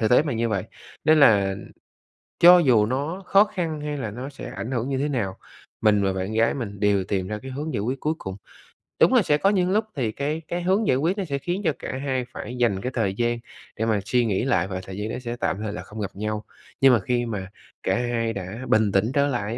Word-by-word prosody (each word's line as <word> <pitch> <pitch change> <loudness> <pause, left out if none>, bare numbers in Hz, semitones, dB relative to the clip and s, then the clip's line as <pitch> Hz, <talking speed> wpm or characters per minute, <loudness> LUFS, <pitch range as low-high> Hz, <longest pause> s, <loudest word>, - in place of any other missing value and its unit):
thực 110 0 +1
tế 125 - +6
mà 150 - -2
như 115 0 0
vậy. 100 -4 -1 0.4
Nên 155 0 +5
là 100 -6 +5 0.9
cho 175 +1 +9
dù 120 -9 +4
nó 145 - -3
khó 195 +2 +6
khăn 170 -7 -3
hay 150 -1 -3
là 110 -6 -4
nó 125 +5 -6
sẽ 140 - -8
ảnh 125 - -5
hưởng 125 +1 -1
như 135 - -1
thế 145 +2 0
nào, 100 -9 -2 0.4
mình 105 -2 +4
và 95 - +1
bạn 95 +3 -3
gái 115 +1 +3
mình 100 -7 -5
đều 100 -2 +2
tìm 95 -1 -2
ra 105 0 -4
cái 135 - -7
hướng 145 +3 -4
giải - - -1
quyết 130 +5 -2
cuối 155 - 0
cùng. 95 0 -6 0.6
Đúng - - +5
là 250 - +6
sẽ 150 -4 +2
có 195 - +3
những 185 -2 +2
lúc 215 +2 +2
thì 120 -6 -1
cái 150 +6 -3
cái 175 +1 -2
hướng 195 +4 +2
giải 130 - +3
quyết 170 +8 0
nó 195 - -2
sẽ 140 -4 -2
khiến 175 +7 -3
cho 155 - +3
cả 130 - -5
hai 130 -3 -1
phải 120 +4 -6
dành 105 -6 +1
cái 125 - -3
thời 100 -5 0
gian 120 0 0 0.4
để 115 - 0
mà 110 -2 +2
suy 120 +1 +2
nghĩ 105 0 0
lại, 95 -9 +2
và 95 -1 -4
thời 95 0 -8
gian 105 +2 -3
đó - - -3
sẽ 120 -1 -4
tạm - - 0
thời 105 -1 -3
là - - -5
không 110 +1 -10
gặp 100 - -3
nhau. 105 +1 -3 0.4
Nhưng 135 -2 +7
mà 115 - +4
khi 120 +5 -1
mà 100 -5 -4 0.4
cả 95 - +1
hai 115 -2 -1
đã 100 +5 -6
bình 110 -2 +3
tĩnh 100 +6 +2
trở 145 -1 +3
lại 120 -3 -2
120 Hz, 260 wpm, -24 LUFS, 105-145 Hz, 0.9 s, cho